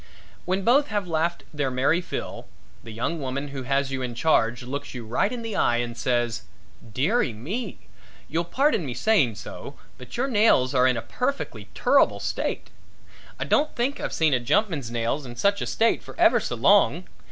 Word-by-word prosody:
When 190 +2 -1
both 270 +6 +4
have 205 -3 -2
laughed 165 +1 -1
their 145 -3 -1
merry 135 +7 +2
fill, - - -6 0.4
the - - -10
young 120 +10 -2
woman 140 +2 -3
who 140 -1 -6
has 135 +1 0
you 135 -1 -3
in 125 -2 -4
charge 120 -4 +2
looks 140 +2 -6
you 120 -2 -6
right 125 - 0
in 245 -2 -5
the 225 -2 -4
eye 120 - +2
and 120 -1 -3
says: 120 -1 0 0.5
"Dearie 145 - +1
me; 195 - -5 0.5
you'll 165 +2 -1
pardon 260 - +1
me 130 -5 -5
saying 130 - +2
so, - - -9 0.2
but 125 - -9
your 260 +3 +1
nails 205 - +3
are 130 -1 +4
in 125 -2 +2
a 115 - -4
perfectly 275 +3 -3
turrible - - +3
state. - - -3 0.7
I - - -2
don't 305 +1 +1
think 255 +4 -1
I've - - -3
seen 160 -3 +2
a 130 - +3
jumpman's 155 - 0
nails 120 +5 -1
in 120 -2 -9
such 200 +10 +1
a - - -2
state 230 0 +2
for - - -13
ever - - +5
so - - -3
long. - - +4
140 Hz, 190 wpm, -25 LUFS, 125-205 Hz, 0.7 s, ever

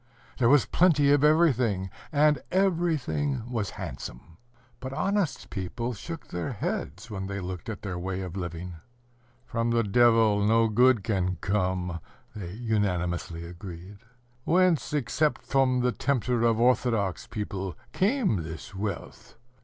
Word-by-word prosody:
There 120 -2 +4
was 145 -1 +5
plenty 150 -6 +4
of 145 0 +4
everything, 125 - +3 0.2
and 150 -2 +3
everything 160 - 0
was 115 -5 -2
handsome.... 80 +7 -8 0.4
But 130 0 -6
honest 195 0 -1
people 115 +5 -3
shook 165 +10 -8
their 85 -1 -3
heads 105 +6 -4
when 95 -2 -4
they 100 0 -4
looked 90 +1 -6
at 110 -1 -6
their 90 -3 -4
way 95 +1 -3
of 90 -1 -6
living. 85 -1 -5 0.7
"From 115 -1 -1
the 115 0 +2
Devil 110 -1 +4
no 115 +2 +4
good 125 0 +4
can 90 -4 0
come," 90 -3 -1 0.4
they 90 -4 -6
unanimously 90 -7 -1
agreed. 90 +2 -9 0.4
"Whence, 180 -1 +3
except 150 +2 0
from 130 -2 +2
the 125 0 +2
tempter 125 -1 0
of 115 -1 +3
orthodox 115 -6 +1
people, 95 -3 -4 0.2
came 210 - +2
this 80 +3 -8
wealth? 100 +1 -6
110 Hz, 135 wpm, -27 LUFS, 95-135 Hz, 0.7 s, was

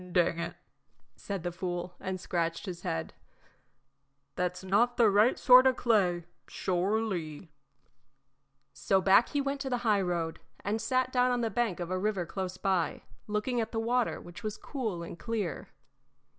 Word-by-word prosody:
"Dang 170 -1 +2
it!" 170 - -4 0.6
said 195 -4 -5
the 175 - -2
fool, 175 0 -4
and 185 0 -4
scratched 170 -1 -2
his 180 -3 -6
head, 80 - -3 1.2
"that's 180 +2 -2
not 230 +6 +2
the 230 -4 +5
right 210 +5 +4
sort 255 +1 +8
o' 260 - +3
clay 185 -9 +2 0.2
sure 190 +4 0
ly." 175 -6 -4 1.2
So 195 - +2
back 195 +4 +5
he 290 - 0
went 275 0 -2
to 270 - -3
the 245 -1 -2
highroad 180 -6 +1 0.3
and 215 +2 -1
sat 255 0 0
down 250 0 +3
on 245 -1 +1
the 225 -1 -1
bank 235 -7 0
of 175 -1 -4
the 185 0 -1
river 200 -3 -1
close 185 0 -4
by, 185 -4 0 0.2
looking 215 +3 0
at 225 - -4
the 225 - -1
water, 240 +2 0
which 175 0 -11
was 215 -1 -4
cool 220 -11 -4
and 170 - -8
clear. 215 -7 -3
195 Hz, 165 wpm, -30 LUFS, 175-235 Hz, 1.2 s, sort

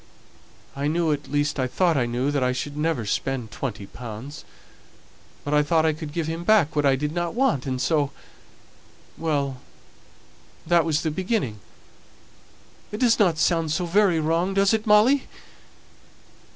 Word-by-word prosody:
I 140 +1 -2
knew 165 +1 +1
at 145 0 -3
least 145 0 0
I 130 - +1
thought 170 +5 +1
I 125 -3 +1
knew 125 +4 -1
that 140 -2 0
I 125 0 +1
should 145 +3 -5
never 150 -6 -1
spend 120 +1 -2
twenty 110 -3 -5
pounds; 120 +6 -9 1.0
but 145 - -3
I 150 - +5
thought 160 +2 +2
I 160 - +2
could 155 -1 -7
give 165 +1 -2
him 165 +2 -4
back 175 -6 +3
what 145 -1 +2
I 135 - +4
didn't 165 +6 -3
want, 160 - +1
and 130 -1 -2
so 145 +1 +1 1.1
well, 140 -5 -2 1.0
that 170 0 +3
was 155 -2 0
the 160 - -1
beginning! 185 - -2 1.3
It 210 - -4
doesn't 210 -9 +3
sound 165 -1 +1
so 175 +3 0
very 180 -1 +3
wrong, 165 +5 0
does 195 +1 +3
it, 220 0 -1
Molly?" 225 +7 +4
155 Hz, 155 wpm, -24 LUFS, 140-175 Hz, 1.3 s, I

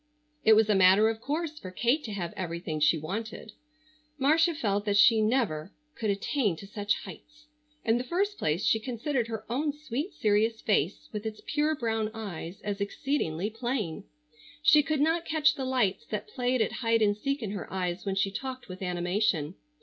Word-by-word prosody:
It 220 - +7
was 220 0 +5
a 215 - +3
matter 195 +3 +6
of 225 0 -4
course 305 +2 -3
for 185 - -7
Kate 240 +10 +1
to 220 - -5
have 175 -4 -4
everything 170 -3 -4
she 150 +2 +4
wanted. 215 +7 -5 0.7
Marcia 320 +4 +3
felt 205 -7 0
that 205 -1 +2
she 220 +2 +6
never 215 -8 0 0.2
could 220 - -2
attain 205 - 0
to 180 - -10
such 205 +1 -1
heights. 300 0 -13 0.4
In 230 0 +3
the - - -2
first 395 +9 -1
place 155 +5 0
she 220 - +3
considered 240 +2 -2
her 220 -1 -5
own 285 +6 0
sweet 295 - -5
serious 220 -1 +2
face 195 -3 0
with 210 -1 -4
its 215 -1 -7
pure 300 +1 +1
brown 225 -4 -1
eyes 190 -5 -6
as 205 -1 -3
exceedingly 200 - -1
plain. 225 -6 -3 0.6
She 300 0 +7
could 295 0 -1
not 325 +2 +2
catch 315 -2 +3
the 270 -3 -4
lights 245 -7 0
that - - -4
played 250 - +1
at - - -3
hide 230 -1 +3
and 205 -1 +3
seek 275 +4 -2
in 205 - -3
her 200 -3 -6
eyes 180 -1 -2
when 195 -1 -2
she 195 0 +1
talked 255 +4 -6
with 185 +1 -9
animation. 180 -2 0
220 Hz, 190 wpm, -28 LUFS, 195-270 Hz, 0.7 s, It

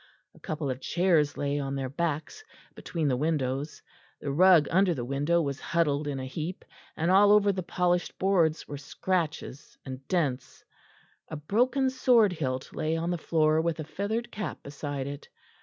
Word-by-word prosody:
A - - -19
couple 150 -3 -3
of 130 +1 -6
chairs 165 -3 +2
lay 145 0 -1
on 135 -1 -3
their 135 -1 -2
backs 160 - -3 0.3
between 165 -3 -3
the 130 - +2
windows; 145 0 -2 0.4
the 140 - -3
rug 175 0 +6
under 185 -1 +3
the 120 -3 -4
window 145 +6 +1
was 140 -2 -3
huddled 150 -3 0
in 140 -2 -3
a 130 - -4
heap, 160 +7 -5 0.3
and 165 +3 +1
all 200 +2 +6
over 205 -1 +5
the 190 -1 -3
polished 180 0 0
boards 175 -5 +1
were 145 - -6
scratches 155 -1 -3
and 130 0 -8
dents; 150 -9 -2 0.6
a 155 - -6
broken 250 - +1
sword 240 -6 +4
hilt 130 -5 -3
lay 160 +1 -1
on 170 +2 -1
the 175 - -1
floor 155 -1 +2
with 165 -1 -1
a - - -2
feathered 205 +9 -3
cap 210 -6 -5
beside 140 -1 -5
it. 140 +1 -7
160 Hz, 175 wpm, -28 LUFS, 140-180 Hz, 0.6 s, rug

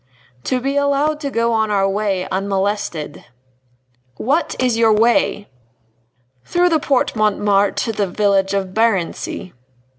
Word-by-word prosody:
"To 255 - 0
be 275 +3 -2
allowed 285 +2 +1
to 285 -2 -3
go 230 -2 0
on 220 -1 +1
our 195 -2 +2
way 195 -2 -1
unmolested." 195 -5 -2 0.9
"What 290 +8 0
is 250 -2 +1
your 225 -1 +3
way?" 225 -1 +2 1.0
"Through 355 +1 +1
the 320 -2 +2
Porte 275 -4 0
Montmartre 205 -2 +2
to 230 - -2
the 205 -2 -1
village 195 0 +1
of 195 -1 -1
Barency." 195 -4 -1
215 Hz, 130 wpm, -18 LUFS, 195-255 Hz, 1.0 s, your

